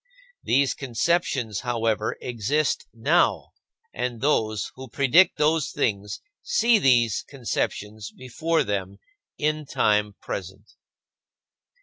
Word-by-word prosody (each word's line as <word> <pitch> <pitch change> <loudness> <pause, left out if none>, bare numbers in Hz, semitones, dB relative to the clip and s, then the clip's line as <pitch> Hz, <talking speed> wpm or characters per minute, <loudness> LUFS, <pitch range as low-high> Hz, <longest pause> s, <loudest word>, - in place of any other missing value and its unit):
These 135 0 +2
conceptions, 130 - -1
however, 115 -3 -1
exist 125 +5 -1
now, 115 -1 +1 0.4
and 120 -1 -3
those 110 -7 0
who 130 0 -10
predict 140 +9 +4
those 155 0 +2
things 105 -7 -2 0.2
see 240 - +3
these 120 - +3
conceptions 110 -4 -3
before 160 +6 -1
them 100 -1 -3 0.4
in 155 0 -1
time 105 -3 +1
present. 100 +2 -7
120 Hz, 95 wpm, -25 LUFS, 105-150 Hz, 0.4 s, predict